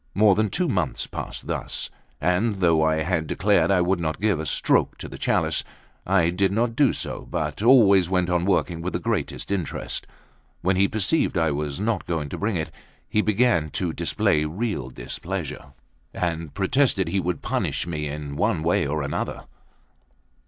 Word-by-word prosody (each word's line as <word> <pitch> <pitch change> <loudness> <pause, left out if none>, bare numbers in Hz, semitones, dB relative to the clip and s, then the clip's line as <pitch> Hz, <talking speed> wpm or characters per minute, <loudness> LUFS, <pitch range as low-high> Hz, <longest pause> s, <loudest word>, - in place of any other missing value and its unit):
More 105 +1 +6
than 110 +1 +1
two 180 - 0
months 90 - -1
passed - - -7
thus; - - -3 0.3
and 90 +7 +1
though 85 -4 +3
I 80 0 +2
had 85 -2 -1
declared 100 +4 +2
I 95 -2 +4
would 90 +1 +1
not 80 -2 -2
give 100 -5 +1
a 80 - -4
stroke - - +2
to - - -7
the - - -10
chalice, - - +1 0.4
I 90 -3 +3
did 95 +1 +1
not 115 +3 0
do 140 -2 +4
so, - - -4
but - - -3
always 100 -7 +6
went 90 -2 +1
on 90 -1 +1
working 90 -3 +1
with 90 +2 -3
the - - -1
greatest 100 -7 -2
interest. 95 -6 -2 0.5
When 95 +1 +2
he 100 +2 +4
perceived 110 - +1
I 80 -2 +2
was 75 0 -3
not 110 +2 -1
going 80 -4 -2
to - - -5
bring 105 0 0
it, 80 -2 -3 0.4
he 105 - +2
began 105 -7 +2
to 90 -4 -1
display 75 -1 +1
real 85 - -3
displeasure, 75 +6 -6 0.4
and 85 -3 -2
protested 100 - +1
he 95 +3 0
would 90 -4 -2
punish - - -1
me 75 -3 -3
in 70 -1 -5
one 80 - 0
way 85 -3 +2
or 75 0 -1
another. 70 - -3
90 Hz, 180 wpm, -24 LUFS, 80-100 Hz, 0.5 s, More